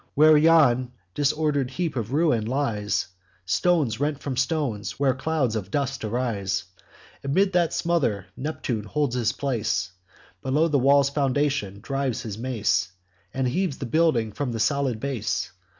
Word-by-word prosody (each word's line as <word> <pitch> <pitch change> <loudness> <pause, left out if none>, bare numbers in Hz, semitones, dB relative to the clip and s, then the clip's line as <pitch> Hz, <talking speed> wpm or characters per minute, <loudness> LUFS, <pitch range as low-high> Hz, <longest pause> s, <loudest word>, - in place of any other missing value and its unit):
Where 155 +2 +7
yon 145 -6 +4 0.2
disorder'd 145 -1 +1
heap 165 +3 -3
of 115 -2 -3
ruin 140 -8 +2
lies, 110 -7 -1 0.4
Stones 120 - +1
rent 145 0 -1
from 140 -3 -4
stones; 130 -5 -1
where 135 -2 +3
clouds 130 -3 -1
of 100 -3 -4
dust 135 +2 -2
arise, 110 -4 -1 0.6
Amid 185 +8 +2
that 175 -2 +2
smother 135 - 0
Neptune 130 -6 -3
holds 145 +2 -1
his 120 -2 +1
place, 110 -9 -1 0.5
Below 150 +5 +1
the 145 -2 +2
wall's 140 +1 +4
foundation 140 -8 0
drives 135 0 -2
his 110 -2 -6
mace, 110 -7 0 0.4
And 130 -1 -1
heaves 175 +3 -1
the 135 - -5
building 120 -5 +2
from 125 +2 -3
the 115 - -3
solid 130 0 +1
base. 135 -3 -2
130 Hz, 145 wpm, -25 LUFS, 115-145 Hz, 0.6 s, Where